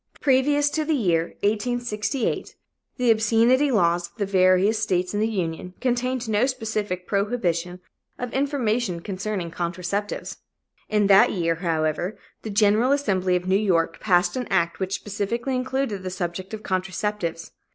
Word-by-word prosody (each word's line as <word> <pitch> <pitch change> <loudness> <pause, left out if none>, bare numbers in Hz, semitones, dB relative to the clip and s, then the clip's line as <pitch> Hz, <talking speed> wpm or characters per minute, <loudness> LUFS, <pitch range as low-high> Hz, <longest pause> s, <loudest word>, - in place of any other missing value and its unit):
Previous 290 +2 +3
to 310 - 0
the 310 0 +1
year 170 - 0
1868, 230 +3 -1 0.4
the 250 -2 +3
obscenity 230 +5 +3
laws 175 -6 +2
of 170 - -35
the 205 - 0
various 190 +2 +3
states 185 -4 0
in 205 - 0
the 215 - +2
Union 180 -3 -3
contained 250 -1 -1
no 220 +3 +2
specific 215 -7 -3
prohibition 180 -4 -1 0.4
of 245 -1 -5
information 240 - 0
concerning 190 -2 -4
contraceptives. 180 +4 -3 0.5
In 210 -1 +2
that 195 0 +6
year, 165 -3 +1
however, 165 +2 -1 0.2
the 220 - -6
General 210 +4 +3
Assembly 190 -10 +1
of 180 0 -2
New 190 - +3
York 185 -5 +1
passed 175 -3 +2
an 255 -1 -3
act 170 -3 +1
which 190 0 -1
specifically 230 +5 -3
included 255 -5 -2
the 185 - -4
subject 185 0 -4
of 215 - -11
contraceptives. 185 -2 -3
205 Hz, 145 wpm, -24 LUFS, 180-240 Hz, 0.5 s, that